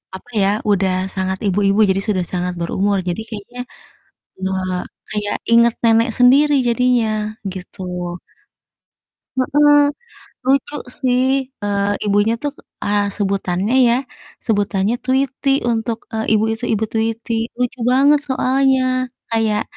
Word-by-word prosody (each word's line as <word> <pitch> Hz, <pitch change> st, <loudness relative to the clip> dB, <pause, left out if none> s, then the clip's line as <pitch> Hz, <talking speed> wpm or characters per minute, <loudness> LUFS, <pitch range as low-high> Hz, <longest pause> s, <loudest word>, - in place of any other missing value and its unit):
apa 190 Hz, -, -12 dB
ya, 195 Hz, -, +3 dB, 0.2 s
udah 190 Hz, -1 st, +2 dB, 0.2 s
sangat 190 Hz, 0 st, -1 dB
ibu-ibu, 200 Hz, +2 st, +2 dB
jadi 195 Hz, +1 st, +1 dB
sudah 185 Hz, -4 st, +1 dB
sangat 180 Hz, 0 st, -1 dB
berumur. 195 Hz, +4 st, 0 dB
Jadi 175 Hz, +5 st, -3 dB
kayaknya 225 Hz, +3 st, -9 dB, 0.8 s
nge 190 Hz, 0 st, -1 dB, 0.6 s
kayak 210 Hz, -1 st, -2 dB, 0.2 s
inget 235 Hz, 0 st, +5 dB
nenek 230 Hz, +1 st, +4 dB
sendiri 275 Hz, +4 st, +5 dB
jadinya 240 Hz, -1 st, +2 dB, 0.4 s
gitu. 185 Hz, +1 st, -10 dB, 1.6 s
Heeh. 290 Hz, +2 st, +4 dB, 0.7 s
Lucu 275 Hz, +2 st, +1 dB, 0.2 s
sih, 250 Hz, -1 st, +2 dB, 0.4 s
eee, 200 Hz, 0 st, 0 dB
ibunya 205 Hz, +2 st, +2 dB
tuh, 290 Hz, -, -1 dB, 0.3 s
eee, 205 Hz, 0 st, +1 dB
sebutannya 195 Hz, +2 st, -1 dB
ya, 235 Hz, -, +4 dB, 0.5 s
sebutannya 205 Hz, 0 st, +1 dB
Tweety 265 Hz, +1 st, 0 dB, 0.2 s
untuk, 230 Hz, 0 st, -1 dB
eee, 220 Hz, 0 st, 0 dB
ibu 215 Hz, +1 st, +3 dB
itu, 225 Hz, +2 st, -5 dB
ibu 220 Hz, 0 st, 0 dB
Tweety. 225 Hz, +1 st, -2 dB, 0.3 s
Lucu 250 Hz, +1 st, -1 dB
banget 285 Hz, +3 st, +5 dB
soalnya. 265 Hz, 0 st, +2 dB, 0.5 s
Kayak 220 Hz, -2 st, +1 dB
225 Hz, 120 wpm, -19 LUFS, 200-250 Hz, 1.6 s, inget